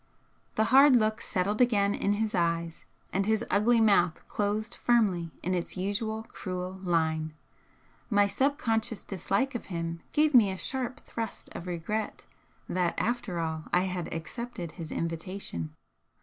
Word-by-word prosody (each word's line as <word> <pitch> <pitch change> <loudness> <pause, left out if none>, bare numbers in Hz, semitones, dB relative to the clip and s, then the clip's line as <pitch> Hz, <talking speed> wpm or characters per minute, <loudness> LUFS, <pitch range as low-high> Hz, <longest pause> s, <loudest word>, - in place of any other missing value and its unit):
The 220 - +3
hard 275 0 +8
look 215 -2 +2
settled 200 +4 0
again 205 -5 +4
in 205 - +1
his 215 +1 -1
eyes, 170 -1 -1 0.3
and 195 +1 +1
his 220 +1 +2
ugly 225 +4 +4
mouth 200 -7 +3
closed 210 +2 -1
firmly 200 -9 +2
in 185 - 0
its 175 +1 -3
usual 215 +3 -2
cruel 185 -3 -5
line. 160 -3 0 0.7
My 205 -2 +5
subconscious 225 -1 0
dislike 200 +7 -1
of 240 - -5
him 165 -2 -4
gave 305 0 +3
me 230 -6 +7
a 190 - -3
sharp 255 +3 -3
thrust 225 -2 -6
of 175 - -6
regret 180 +5 -3 0.4
that, 180 -1 0
after 235 -6 -1
all, 160 -1 -2
I 180 - +4
had 180 -2 -3
accepted 170 +2 -5
his 160 -1 -8
invitation. 165 - -4
200 Hz, 145 wpm, -29 LUFS, 170-220 Hz, 0.7 s, hard